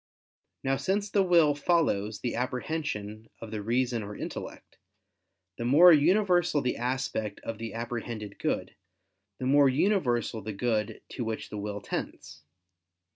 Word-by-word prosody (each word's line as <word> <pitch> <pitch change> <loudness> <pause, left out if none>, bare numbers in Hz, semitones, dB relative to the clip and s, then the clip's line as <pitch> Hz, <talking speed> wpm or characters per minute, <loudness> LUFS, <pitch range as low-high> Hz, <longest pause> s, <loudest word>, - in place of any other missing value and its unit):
Now 135 0 +1
since 200 +8 -1
the 200 - +3
will 170 -5 +5
follows 140 - 0
the 120 - -2
apprehension 120 -4 -3
of 115 - -9
the 110 -1 -3
reason 120 +2 0
or 105 0 -7
intellect; - - -8 0.8
the - - -2
more 160 +9 +8
universal 175 0 +3
the 125 -2 -1
aspect 120 -4 -2
of 115 -1 -6
the 115 -1 -6
apprehended 115 -3 -5
good, - - -2 0.6
the 130 - -4
more 140 +1 +5
universal 130 - +1
the 110 +1 -5
good 110 0 -1
to 125 - -4
which 110 -1 -4
the 105 - -4
will 105 0 -4
tends. 75 - -6
125 Hz, 140 wpm, -28 LUFS, 110-150 Hz, 0.8 s, more